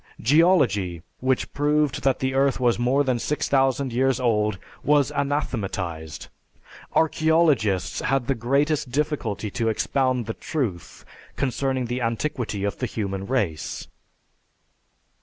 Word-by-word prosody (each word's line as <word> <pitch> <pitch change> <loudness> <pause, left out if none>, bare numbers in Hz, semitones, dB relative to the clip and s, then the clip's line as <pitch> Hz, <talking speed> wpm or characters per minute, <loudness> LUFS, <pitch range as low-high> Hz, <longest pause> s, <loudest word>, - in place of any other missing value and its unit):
Geology, 120 - +3 0.2
which 130 0 0
proved 145 -1 +1
that 135 -2 +2
the 130 0 -1
earth 135 0 +2
was 120 -2 +2
more 130 +4 +2
than 130 -3 0
6000 135 -2 +1
years 130 +1 +2
old, 105 -4 +1 0.3
was 145 -2 +3
anathematized; 100 - -3 0.7
archeologists 155 - +2
had 135 -2 0
the 135 - +1
greatest 140 +4 0
difficulty 120 - -2
to 115 +1 0
expound 130 +2 0
the 110 - -3
truth 110 - -4 0.3
concerning 130 -1 -1
the 120 +2 -3
antiquity 115 -3 -2
of 100 - -2
the 125 - -1
human 100 -3 -4
race. 95 - -2
130 Hz, 120 wpm, -24 LUFS, 110-140 Hz, 0.7 s, Geology